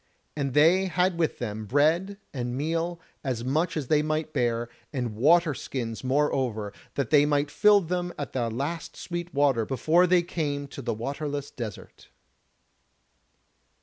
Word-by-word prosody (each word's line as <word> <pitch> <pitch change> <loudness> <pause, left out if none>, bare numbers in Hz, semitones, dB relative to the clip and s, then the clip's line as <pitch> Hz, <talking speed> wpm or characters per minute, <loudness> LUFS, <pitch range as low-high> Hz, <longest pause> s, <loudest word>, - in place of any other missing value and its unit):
And 140 -3 -2
they 170 +6 +5
had 180 -1 +1
with 160 - +1
them 110 -2 -4
bread 160 - +2 0.2
and 125 -2 -3
meal, 165 +3 -1 0.2
as 125 -5 -2
much 160 +6 0
as 150 - -2
they 150 +3 +3
might 155 0 -2
bear, 120 -1 0 0.2
and 125 -6 -3
water 160 +6 +4
skins 120 -4 -5
moreover, 130 -6 0 0.2
that 140 -4 -2
they 145 -2 +7
might 145 -1 +1
fill 210 +3 +5
them 175 0 -2
at 145 - -5
the 120 -3 0
last 160 +8 -4
sweet 175 0 -5
water 140 -6 +2
before 155 +9 +3
they 180 0 +4
came 145 -5 -3
to 140 - -8
the 115 -3 -2
waterless 145 +4 -4
desert. 110 -5 -8
145 Hz, 150 wpm, -27 LUFS, 125-165 Hz, 0.2 s, they